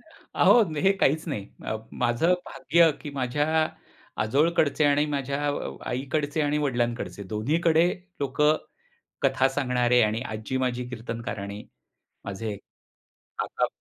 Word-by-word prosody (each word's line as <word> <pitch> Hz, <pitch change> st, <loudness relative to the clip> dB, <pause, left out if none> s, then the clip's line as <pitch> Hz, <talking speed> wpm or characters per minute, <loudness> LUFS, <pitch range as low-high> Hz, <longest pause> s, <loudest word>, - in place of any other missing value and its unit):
अहो, 240 Hz, -, +3 dB, 0.2 s
हे 195 Hz, +4 st, +5 dB
काहीच 155 Hz, +5 st, +2 dB
नाही, 130 Hz, -10 st, -3 dB, 0.2 s
अ, 110 Hz, -, -1 dB, 0.2 s
माझं 120 Hz, +9 st, +2 dB
भाग्य 170 Hz, -1 st, +3 dB
की 145 Hz, -, -6 dB
माझ्या 140 Hz, +2 st, -1 dB, 0.8 s
आजोळकडचे 150 Hz, +5 st, +2 dB
आणि 145 Hz, +1 st, +4 dB
माझ्या 140 Hz, 0 st, -2 dB
अ, 70 Hz, -, -3 dB
आईकडचे 145 Hz, +4 st, -1 dB
आणि 150 Hz, 0 st, +1 dB
वडिलांकडचे 120 Hz, -6 st, -1 dB
दोन्हीकडे 160 Hz, -, +2 dB, 0.3 s
लोक 135 Hz, 0 st, -3 dB, 0.8 s
कथा 135 Hz, -1 st, +3 dB
सांगणारे 125 Hz, -3 st, +2 dB
आणि 110 Hz, +1 st, +1 dB
आजी 110 Hz, +2 st, -4 dB
माझी 125 Hz, -1 st, -1 dB
कीर्तनकार 115 Hz, -2 st, -5 dB
आणि 100 Hz, +1 st, -6 dB, 0.6 s
माझे, 100 Hz, +2 st, -4 dB, 0.8 s
काका -, -, 0 dB
130 Hz, 115 wpm, -26 LUFS, 115-145 Hz, 0.8 s, हे